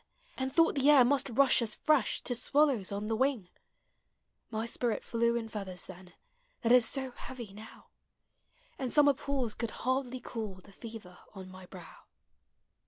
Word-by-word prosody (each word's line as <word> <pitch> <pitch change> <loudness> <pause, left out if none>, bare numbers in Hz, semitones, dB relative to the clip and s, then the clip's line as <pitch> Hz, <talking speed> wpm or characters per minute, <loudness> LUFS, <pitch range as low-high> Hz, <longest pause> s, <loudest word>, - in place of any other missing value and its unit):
And 265 0 -3
thought 330 +3 +4
the 275 0 +2
air 275 -4 +7
must 275 +1 +2
rush 260 +1 +4
as 220 -2 -1
fresh 300 -8 +1
To 245 - -3
swallows 255 -4 +2
on 200 +1 -3
the 225 +1 -1
wing; 250 -6 0 1.0
Mv 220 +1 -2
spirit 235 -1 -2
dew 235 0 +2
in 230 -1 -2
feathers 195 -5 -5
then. 185 -1 -12 0.5
That 230 - +2
is 245 -2 +6
so 265 -2 -2
heavy 240 -5 -9
now, 215 +2 -13 0.9
And 255 -3 -3
summer 290 -1 +5
pools 265 -4 -3
could 230 -1 -4 0.2
hardly 260 0 -1
cool 220 -5 -6
The 185 +2 -17
fever 215 -5 -11 0.2
on 190 -1 -9
my 185 -1 -12
brow 180 -3 -13
235 Hz, 165 wpm, -31 LUFS, 210-265 Hz, 1.0 s, air